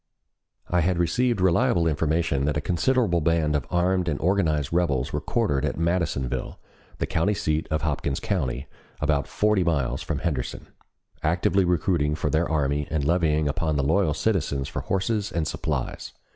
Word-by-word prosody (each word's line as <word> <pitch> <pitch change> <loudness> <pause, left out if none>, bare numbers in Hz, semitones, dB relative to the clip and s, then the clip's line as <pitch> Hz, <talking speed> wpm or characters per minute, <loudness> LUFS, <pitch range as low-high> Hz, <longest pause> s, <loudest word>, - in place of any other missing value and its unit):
I 90 0 +2
had 90 +2 +1
received 115 +7 +1
reliable 95 +1 +3
information 75 -2 +1
that 75 0 0
a - - +1
considerable 90 - +1
band 80 -1 +1
of 70 - -2
armed 90 +1 +1
and 75 - -2
organized 80 -6 +1
rebels 70 -8 0
were 75 - -1
quartered 75 - 0
at 75 - -1
Madisonville, 85 -6 -1 0.4
the - - -1
county 100 +6 0
seat 75 -3 -1
of 80 0 -1
Hopkins 70 -2 -1
County, 70 - -2 0.3
about 75 -1 +1
forty 105 -3 +2
miles 70 -7 0
from - - -3
Henderson, 75 -8 -3 0.6
actively 85 +4 +2
recruiting 85 -3 +1
for 75 -1 -2
their 80 +2 +1
army 75 -2 0
and 75 -3 -1
levying 80 -2 +2
upon 80 +2 -1
the 70 - +1
loyal 80 +1 +2
citizens 75 -10 0
for - - -4
horses 105 +2 -1
and 85 -5 -1
supplies. - - -3
80 Hz, 160 wpm, -25 LUFS, 75-90 Hz, 0.6 s, reliable